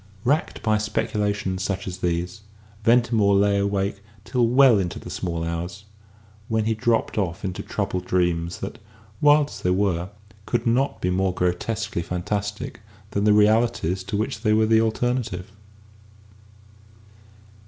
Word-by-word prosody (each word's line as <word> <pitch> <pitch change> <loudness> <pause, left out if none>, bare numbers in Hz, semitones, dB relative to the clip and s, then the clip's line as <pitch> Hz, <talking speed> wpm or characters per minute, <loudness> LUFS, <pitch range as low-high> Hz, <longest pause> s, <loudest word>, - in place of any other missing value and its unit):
Racked 150 +7 0
by 110 -2 +2
speculations 105 -3 -1
such 100 0 -2
as 90 -1 -5
these, 90 +4 -2 0.4
Ventimore 115 -3 +4
lay 100 0 +3
awake 100 0 -1 0.2
till 125 -2 +2
well 125 -2 +6
into 90 -3 -2
the - - -9
small 85 -2 -3
hours, 85 +4 -4 0.6
when 110 -1 0
he 110 - +2
dropped 115 -1 0
off 90 -3 -2
into 90 -2 -3
troubled 90 - -3
dreams 85 -1 0
that, 100 - -6 0.4
wild 145 0 +5
as - - -9
they 90 - 0
were, 90 -2 +1 0.4
could 120 0 -1
not 125 +4 +1
be 90 - 0
more 95 0 0
grotesquely 90 +3 -1
fantastic 105 +8 -3 0.3
than 100 +1 0
the 105 - +5
realities 105 -4 +2
to 100 - -2
which 110 0 -2
they 110 -2 +2
were 110 0 +4
the 110 0 +4
alternative. 115 -4 -1
105 Hz, 145 wpm, -24 LUFS, 90-115 Hz, 0.6 s, well